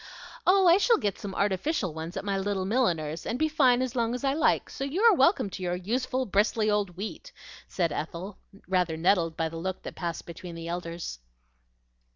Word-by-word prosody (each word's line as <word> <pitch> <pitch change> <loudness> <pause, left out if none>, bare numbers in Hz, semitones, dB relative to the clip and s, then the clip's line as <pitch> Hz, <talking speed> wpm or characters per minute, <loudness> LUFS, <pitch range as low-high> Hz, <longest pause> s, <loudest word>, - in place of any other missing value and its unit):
"Oh, 380 +1 +5
I 345 +1 +7
shall 465 +2 +4
get 205 -2 -2
some 195 -2 -6
artificial 200 - 0
ones 160 +4 -6
at 195 - -4
my 200 -1 0
little 195 -1 -1
milliner's, 170 -9 0
and 235 - -2
be 315 - +2
fine 260 -5 +3
as 255 -1 -4
long 235 0 0
as 250 - -6
I 270 0 +2
like; 310 - +2
so - - -6
you 280 +7 -2
are 460 -2 +8
welcome 330 - +3
to 185 - -7
your 180 -1 -1
useful, 250 +7 -1
bristly 215 +1 +2
old 200 -4 -1
wheat," 220 - -6 0.4
said 170 -4 -1
Ethel, 170 +7 -5 0.3
rather 180 -3 +1
nettled 165 -1 +2
by 165 - 0
the 165 +1 -7
look 185 +2 -4
that - - -6
passed 170 -2 -4
between 170 0 -9
the 165 0 -7
elders. 170 - -5
195 Hz, 200 wpm, -28 LUFS, 170-255 Hz, 0.4 s, are